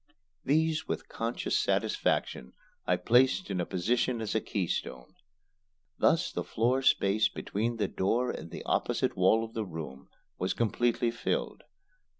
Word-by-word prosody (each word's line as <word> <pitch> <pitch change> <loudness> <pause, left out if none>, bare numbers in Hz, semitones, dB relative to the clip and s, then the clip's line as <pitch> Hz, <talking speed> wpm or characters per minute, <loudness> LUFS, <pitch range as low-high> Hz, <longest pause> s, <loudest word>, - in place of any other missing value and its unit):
These, 160 +2 +1
with - - -3
conscious 115 +1 -2
satisfaction, 65 - 0 0.3
I - - +4
placed 130 +9 +3
in 90 - 0
position 120 +6 0
as 110 -2 -3
a 110 - +1
keystone. 80 - -3 0.9
Thus 165 +2 +3
the - - -3
floor 125 +4 +1
space 105 -4 +3
between 115 +3 -3
the 105 -3 0
door 120 +8 0
and 80 - -7
the - - -7
opposite - - 0
wall 95 +5 +4
of 115 0 -8
the 110 - -2
room 80 -7 -8 0.3
was 90 - -1
completely 120 +1 +1
filled. 115 - -3
115 Hz, 140 wpm, -30 LUFS, 95-120 Hz, 0.9 s, I